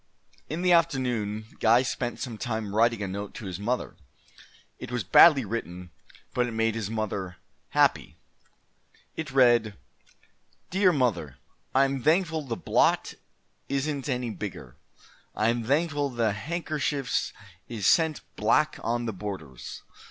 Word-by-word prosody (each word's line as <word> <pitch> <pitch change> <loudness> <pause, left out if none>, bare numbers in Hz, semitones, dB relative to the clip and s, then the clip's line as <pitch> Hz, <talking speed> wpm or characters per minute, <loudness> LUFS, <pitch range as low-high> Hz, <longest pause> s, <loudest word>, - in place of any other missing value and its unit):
In 165 +4 -3
the 180 - +3
afternoon 125 -10 +1
Guy 115 +3 +5
spent 125 -1 -3
some 120 -5 -5
time 110 0 -3
writing 115 0 +2
a - - -2
note 100 +2 -6
to - - -7
his 95 -1 -5
mother. 120 +5 -2 0.8
It - - -8
was 120 -3 -1
badly 135 - +7
written, 90 -5 -5 0.4
but 125 0 +1
it 120 - -5
made 115 0 +1
his 110 -3 -3
mother 100 -5 -3 0.3
happy. - - +2 1.0
It 160 -2 -4
read: 120 -5 +4 0.9
DEAR 190 0 +4
MOTHER: 100 - 0 0.4
I 135 +1 +6
am 135 -1 -2
Thankful 160 +2 +2
the 120 -6 -4
blot - - +2 0.6
isent 140 +1 -2
any 125 -2 -1
bigger. 90 - -7 0.6
I 110 +1 +2
am 120 0 0
Thankful 145 +1 +1
the 115 -4 0
hankershefs 150 - -2 0.4
isent 150 - +2
black 150 +8 +2
on 120 +1 -1
the 110 - -2
borders. 90 -10 -7
120 Hz, 135 wpm, -27 LUFS, 105-140 Hz, 1.0 s, badly